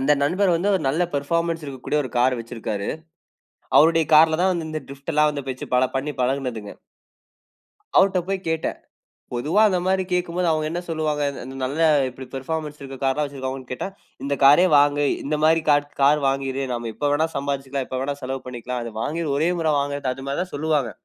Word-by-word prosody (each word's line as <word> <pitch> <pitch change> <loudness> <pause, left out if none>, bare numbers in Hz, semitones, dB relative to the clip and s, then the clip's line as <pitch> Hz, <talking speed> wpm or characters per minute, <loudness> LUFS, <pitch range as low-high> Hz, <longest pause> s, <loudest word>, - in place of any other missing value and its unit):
அந்த 135 +3 +3
நண்பர் 180 +3 +2
வந்து 195 +5 0
ஒரு 185 - 0
நல்ல 160 +6 +1
பெர்ஃபார்மன்ஸ் 165 +3 -1
இருக்கக்கூடிய 140 +2 -2
ஒரு 125 - -6
கார் 125 0 +3
வைச்சிருக்காரு. 115 -3 -4 0.9
அவருடைய 165 +1 +5
கார்ல 160 +1 +6
தான் 190 - +3
வந்து 165 -3 -3
இந்த 155 -1 -4
டிரிப்டுல்லாம் 145 +1 0
வச்சி 130 - -6
பல 130 +1 +4
பண்ணி 145 +2 -2
பழகுனதுங்க. 125 -5 -2 1.2
அவர்ட 190 -1 +4
போய் 195 0 -1
கேட்டேன். 160 0 -2 0.6
பொதுவா 155 - +1
அந்த 185 -2 +1
மாரி 190 0 +2
கேட்கும்போது 180 0 0
அவங்க 155 -1 0
என்ன 170 +2 -3
சொல்லுவாங்க? 155 -2 -1
இந்த - - -9
இந்த 130 +1 -8
நல்ல 140 +5 -4 0.3
இப்படி 130 +1 -10
பெர்ஃபார்மன்ஸ் 150 +2 -4
இருக்கிற 135 -1 -8
கார் 135 - +3
எல்லாம் 150 +2 -1
வச்சிருக்காங்கன்னு 130 -2 -6
கேட்டா, 125 - -3 0.4
"இந்த 140 0 0
காரே 145 +6 +7
வாங்கு, 145 0 +3 0.2
இந்த 150 +2 0
மாரி 160 +1 +4
காட் 145 0 +3
கார் 145 +2 +5
வாங்கிரு. 135 0 -1
நாம 120 -1 -4
எப்ப 145 - -1
வேணா 155 +2 +2
சம்பாரிச்சுக்கலாம். 140 -1 -3
எப்ப 130 - -3
வேணா 140 +1 -2
செலவு 130 0 -4
பண்ணிக்கலாம். 125 0 -5
அது 115 - -7
வாங்கி 165 +7 -2
ஒரே 160 +4 +2
முறை 160 -2 +1
வாங்குறது" 140 -2 -2
அது 135 +1 -9
மாரி 140 +3 -2
தான் 180 - -14
சொல்லுவாங்க. 150 -5 0
145 Hz, 185 wpm, -23 LUFS, 135-160 Hz, 1.2 s, காரே